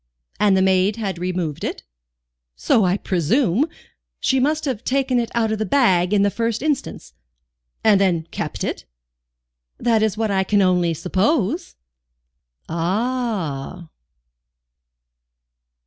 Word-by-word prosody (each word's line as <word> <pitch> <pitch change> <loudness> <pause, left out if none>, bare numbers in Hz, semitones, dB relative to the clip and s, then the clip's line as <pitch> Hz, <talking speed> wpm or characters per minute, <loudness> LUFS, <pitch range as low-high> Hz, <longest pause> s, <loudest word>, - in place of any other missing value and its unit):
"And 205 -2 +4
the 190 - +3
maid 190 +2 +2
had 195 -6 -4
removed 180 -4 -3
it?" - - -4 0.7
"So 215 - +2
I 185 +2 +2
presume; 205 - +1 0.5
she 265 - +1
must 300 +4 0
have 255 -5 -3
taken 260 -1 +1
it 235 - -2
out 225 -2 +1
of 220 - -2
the - - +1
bag 185 -7 +3
in 205 -1 +3
the 200 - +2
first 230 +3 -2
instance." 300 -3 -3 0.7
"And 210 -3 +5
then 170 -4 +1
kept - - -4
it?" - - -4 0.9
"That 230 -2 +2
is 220 -1 0
what 220 -2 0
I 190 -1 +2
can 200 +1 +2
only 180 -3 +2
suppose." 185 - 0 0.9
"Ah!" 180 - -2
200 Hz, 130 wpm, -21 LUFS, 180-235 Hz, 0.9 s, And